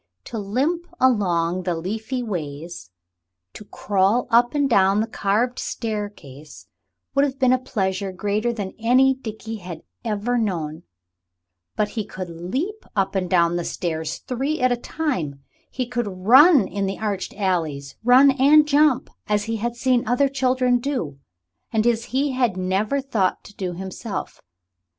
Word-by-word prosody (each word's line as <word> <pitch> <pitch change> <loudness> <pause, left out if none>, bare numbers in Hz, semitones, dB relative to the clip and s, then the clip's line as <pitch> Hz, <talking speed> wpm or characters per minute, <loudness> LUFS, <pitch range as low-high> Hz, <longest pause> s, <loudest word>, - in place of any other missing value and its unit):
To 230 - -6
limp 280 - -1
along 185 -8 +2
the 175 -1 -1
leafy 220 +9 -3
ways, 160 - -6 0.6
to - - -10
crawl 205 +4 +1
up 240 +4 +4
and 285 -1 +2
down 200 -4 +4
the 220 - +1
carved 225 +3 0
staircase 205 - -6 0.5
would 275 - +3
have 275 -2 -1
been 255 -2 +4
a 255 - +2
pleasure 195 -5 -2
greater 205 +5 -1
than 205 -5 -5
any 255 +4 +4
Dickie 225 -3 -7
had 175 -4 -9 0.2
ever 230 +2 -1
known; 165 -8 -2 0.9
but 210 - 0
he 220 -1 -3
could 185 -3 -7
leap 260 - -4
up 195 -2 +1
and 185 -2 -1
down 170 -1 +3
the 175 - -2
stairs 160 -3 -3
three 270 +5 -3
at 255 0 +3
a - - +3
time, 185 - -3 0.3
he 255 - -3
could 240 -2 -2
run 235 - +6
in 200 +1 -2
the 195 - -3
arched 205 -3 -3
alleys 160 -8 -2
run 255 +4 +7
and 290 +3 +5
jump 295 -2 +3 0.2
as 210 -1 +1
he 225 +1 -2
had 235 +2 -3
seen 245 -1 +1
other 250 +4 +3
children 255 -2 +2
do, 240 - -3 0.5
and 220 0 +1
as 230 -1 +1
he 275 +3 0
had 245 -7 0
never 195 +9 0
thought 220 -9 -1
to 205 - -14
do 185 -2 -3
himself. 190 +3 -6
215 Hz, 155 wpm, -22 LUFS, 185-255 Hz, 0.9 s, run